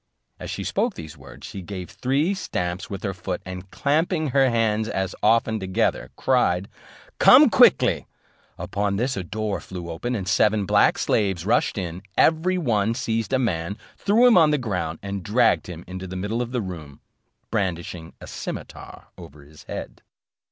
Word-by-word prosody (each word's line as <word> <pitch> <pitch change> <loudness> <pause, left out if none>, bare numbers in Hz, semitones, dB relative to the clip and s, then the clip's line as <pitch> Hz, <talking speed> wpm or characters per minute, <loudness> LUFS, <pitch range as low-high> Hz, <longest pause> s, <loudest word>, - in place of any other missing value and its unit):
As - - -7
she - - -4
spoke - - -1
these 80 -1 -9
words, 70 -2 -13
she 100 - -7
gave 90 -1 -7
three 140 +9 0
stamps 90 - -3
with 100 -2 -6
her 100 -2 -2
foot, 90 0 -4
and 90 +1 -8
clapping 155 - 0
her 135 0 +3
hands 110 -2 +1
as 95 -1 -2
often 110 0 +3
together, 95 -1 -1
cried, 100 -8 +1 0.5
"Come - - +8
quickly:" - - +4 0.5
upon 100 0 -2
this, 125 +5 -1
a 95 - -3
door 105 +3 -3
flew 90 -2 -7
open, 120 +10 -3
and 95 -4 -4
seven 105 +2 +2
black - - +4
slaves 95 -5 0
rushed 115 +1 +1
in; 90 -2 -4 0.2
every 165 +4 +3
one 115 - +1
seized 115 -2 -2
a 130 - +3
man, 100 -6 -1 0.2
threw 220 +5 +3
him 235 -7 +7
on 160 -2 +5
the 150 - +2
ground, 90 - -3
and 100 -1 -4
dragged 115 +6 +2
him 85 -1 -8
into 95 +1 -7
the 90 - -7
middle 105 +6 -2
of 120 0 -4
the 125 -2 -1
room, 80 -7 -8 0.5
brandishing 90 -5 -3
a - - -10
cimeter - - -8 0.2
over 75 +1 -12
his 75 +2 -16
head. - - -7
100 Hz, 175 wpm, -23 LUFS, 90-120 Hz, 0.5 s, Come